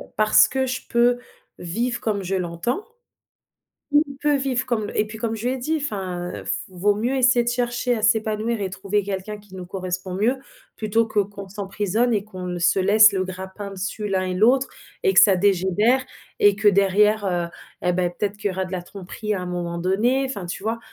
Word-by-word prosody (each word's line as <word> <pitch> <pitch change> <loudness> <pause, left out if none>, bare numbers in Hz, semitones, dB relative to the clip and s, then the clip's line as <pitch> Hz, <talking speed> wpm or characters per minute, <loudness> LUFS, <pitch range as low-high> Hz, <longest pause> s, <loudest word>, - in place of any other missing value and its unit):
parce 215 0 +5
que 265 0 -1
je 255 0 -3
peux 240 +1 +3 0.4
vivre 235 +8 -2
comme 205 -3 -2
je 190 +1 -2
l'entends, 180 - -2 1.2
il 280 - -9
peut 295 0 +2
vivre 265 -2 -1
comme 220 -4 -1
et 210 - +2
puis 215 +1 -9
comme 225 -1 -2
je 220 +1 -6
lui - - 0
ai - - -3
dit 310 +6 -1
enfin: 185 - -4
«F - - -1 0.2
vaut 195 +3 +1
mieux 240 +6 -1
essayer 250 -2 +4
de 235 - 0
chercher 240 0 0
à 220 - -4
s'épanouir 220 0 +1
et 195 -2 -3
trouver 200 +2 -1
quelqu'un 200 +2 -4
qui 205 -2 -18
nous 185 -1 -8
correspond 185 0 -4
mieux, 235 +7 +1 0.4
plutôt 225 +1 +1
que 215 -1 0
qu'on 200 0 -4
s'emprisonne 205 +4 -1
et 210 -3 +1
qu'on 185 -3 -8
ne 180 0 -3
se 170 +2 +2
laisse 215 +3 +6
le 190 -1 0
grappin 190 +2 -7
dessus 200 +2 -4
l'un 190 -2 0
et 185 - -2
l'autre 245 +8 +3 0.4
et 390 -3 +3
que - - +7
ça 195 -3 +6
dégénère 200 +6 +2 0.4
et 205 -1 +5
que 215 +1 +1
derrière, 205 +2 +4
heu 175 -2 -1 0.4
et 180 - +3
ben, 180 0 +1
peut-être 200 +3 -3
qu'il 205 0 -2
y - - -2
aura 190 0 -2
de 185 - -10
la 185 -2 -3
tromperie 200 +4 -5
à 185 - -3
un - - -5
moment 175 -1 -3
donné», 215 +10 +1
enfin 205 -9 -5
tu 175 - -6
vois? 225 +2 -1
205 Hz, 210 wpm, -23 LUFS, 185-235 Hz, 1.2 s, que